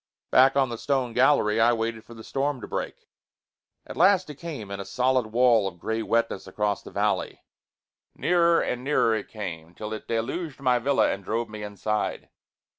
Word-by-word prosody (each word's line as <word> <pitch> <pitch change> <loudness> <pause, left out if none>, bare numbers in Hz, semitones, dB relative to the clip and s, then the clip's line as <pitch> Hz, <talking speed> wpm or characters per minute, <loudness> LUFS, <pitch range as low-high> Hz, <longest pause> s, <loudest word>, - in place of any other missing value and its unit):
Back 130 +1 +6
on 135 -2 +3
the 115 -1 -5
stone 130 -4 -1
gallery 120 -4 +3
I 120 +1 +5
waited 115 -1 -3
for 120 - -13
the 110 - -11
storm 140 +2 -2
to - - -7
break. - - -5 0.8
At - - -9
last 185 +1 +4
it 145 - -13
came 140 -12 -7
in 100 - -5
a - - -4
solid 125 +4 +1
wall 115 -2 +3
of 90 -2 -7
gray 110 +6 -2
wetness 115 -4 -1
across 105 +1 -1
the - - -11
valley. - - -1 0.7
Nearer 170 -1 +3
and 125 0 -3
nearer 135 -5 +2
it 110 -2 -3
came 85 -6 -7
till 105 0 -6
it 110 - -7
deluged 135 +7 -3
my 125 -2 +2
villa 135 +3 +2
and 100 - -5
drove 115 +3 -2
me 110 0 -8
inside. 105 +1 -3
115 Hz, 190 wpm, -26 LUFS, 105-135 Hz, 0.8 s, Back